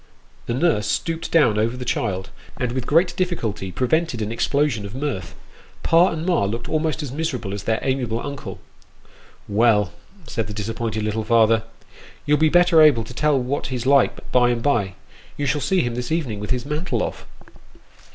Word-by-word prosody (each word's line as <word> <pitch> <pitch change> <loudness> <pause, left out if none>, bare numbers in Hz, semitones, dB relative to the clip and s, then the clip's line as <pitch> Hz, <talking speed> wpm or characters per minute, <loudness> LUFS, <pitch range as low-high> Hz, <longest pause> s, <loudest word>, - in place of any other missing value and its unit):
" - - -31
The 115 - -1
nurse 130 -9 +1
stooped 165 +7 -2
down 135 -10 +4
over 115 +3 0
the 125 - -6
child, 95 -5 -2 0.3
and 125 -3 -1
with 125 -1 -3
great 170 +4 +3
difficulty 115 - -2
prevented 130 - 0
an 105 - -4
explosion 140 -1 0
of 100 +3 -8
mirth. 130 - -4 0.5
Pa 170 +3 +5
and 160 +1 -4
ma 180 - +2
looked 115 +4 -4
almost 155 0 -1
as 140 - -5
miserable 130 -9 -3
as 100 - -6
their 110 -1 +1
amiable 125 -4 -1
uncle. 140 +1 -6 0.5
" - - -27
Well! 105 -6 +3 0.2
" 190 -3 -23
said 115 -6 -3
the 105 - -7
disappointed 110 0 -3
little 110 +1 -1
father, 115 0 +3 0.3
" - - -21
you'll 150 0 +3
be 155 0 +4
better 175 -1 +5
able 145 -7 +6
to 115 - -10
tell 150 +2 +2
what 130 +3 -2
he's 125 -2 -4
like 140 -1 +2
by 125 -1 +4
and 120 -1 -1
by. 105 -10 +1 0.4
You 145 - -2
shall 150 +1 0
see 190 +4 +2
him 120 -1 -2
this 125 +2 -4
evening 140 -11 -1
with 105 - -6
his 125 0 -1
mantle 150 +4 -2
off." - - -6
125 Hz, 195 wpm, -22 LUFS, 110-150 Hz, 0.5 s, able